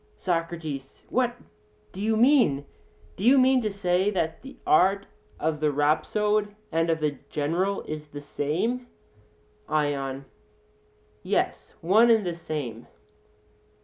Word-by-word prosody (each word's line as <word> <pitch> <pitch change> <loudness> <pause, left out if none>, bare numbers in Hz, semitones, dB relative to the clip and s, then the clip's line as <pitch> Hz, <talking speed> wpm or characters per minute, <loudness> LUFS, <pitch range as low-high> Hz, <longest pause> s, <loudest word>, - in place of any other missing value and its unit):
SOCRATES: 165 -6 -3
What 245 -1 +1 0.6
do 190 - -8
you 220 +1 +1
mean? 230 - +4 0.5
Do 190 - -6
you 255 +5 +6
mean 260 0 +5
to 215 - -1
say 190 -1 +1
that 165 -5 -2
the 270 +1 -11
art 200 - +4 0.3
of 155 -1 -1
the 150 -1 +2
rhapsode 205 +9 +1 0.2
and 165 +1 +1
of 160 -1 0
the 150 -3 -1
general 170 +7 -1
is 155 -1 -6
the 145 0 -8
same? 175 - -2 0.8
ION: 140 -3 -1 1.0
Yes, - - -2
one 215 +8 +5
and 220 -3 +4
the 175 - -1
same. 145 -9 -6
170 Hz, 125 wpm, -26 LUFS, 150-215 Hz, 1.0 s, you